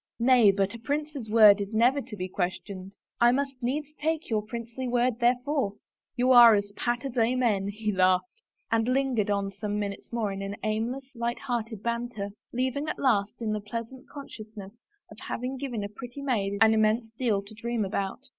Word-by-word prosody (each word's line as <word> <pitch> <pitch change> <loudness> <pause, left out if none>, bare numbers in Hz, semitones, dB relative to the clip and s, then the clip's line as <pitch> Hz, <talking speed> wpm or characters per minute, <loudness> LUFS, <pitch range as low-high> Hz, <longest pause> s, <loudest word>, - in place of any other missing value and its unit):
" - - -66
Nay, 240 -3 +6
but 195 +1 +1
a 230 - -8
prince's 285 -1 -3
word 210 -2 +7
is 200 +2 -5
never 250 +5 +4
to 230 -3 -9
be 185 -2 -4
questioned." 185 +1 -4 0.2
I 240 0 +6
must 270 0 -2
needs 290 +5 -2
take 315 -2 -2
your 215 -1 +2
princely 235 +3 -6
word 245 -1 +1
therefore." 250 -1 +1 0.4
You 255 +1 +2
are 240 -3 +9
as 205 0 -2
pat 240 +4 -2
as 265 -2 -5
amen," 225 -4 +2
he 210 +1 -2
laughed, 185 - +1 0.3
and 225 0 +2
lingered 255 -5 +1
on 200 -1 0
some 205 +1 -4
minutes 200 -1 -5
more 225 -4 -1
in 195 +1 -5
aimless, 235 +5 -2
light 235 0 -2
hearted 225 -5 -4
banter, 235 -3 -3 0.2
leaving 260 +4 -1
at - - -3
last 220 -4 +1
in 215 - -1
the 215 0 -2
pleasant 230 +5 -7
consciousness 215 -7 -10 0.4
of - - -12
having 255 +3 -4
given 250 -5 -4
a - - -3
pretty 245 +6 -9
maid 200 -7 0
an 220 0 +7
immense 220 +1 +2
deal 225 -4 0
to 200 - -13
dream 230 -1 -2
about. 195 +3 -3
230 Hz, 185 wpm, -27 LUFS, 205-255 Hz, 0.4 s, are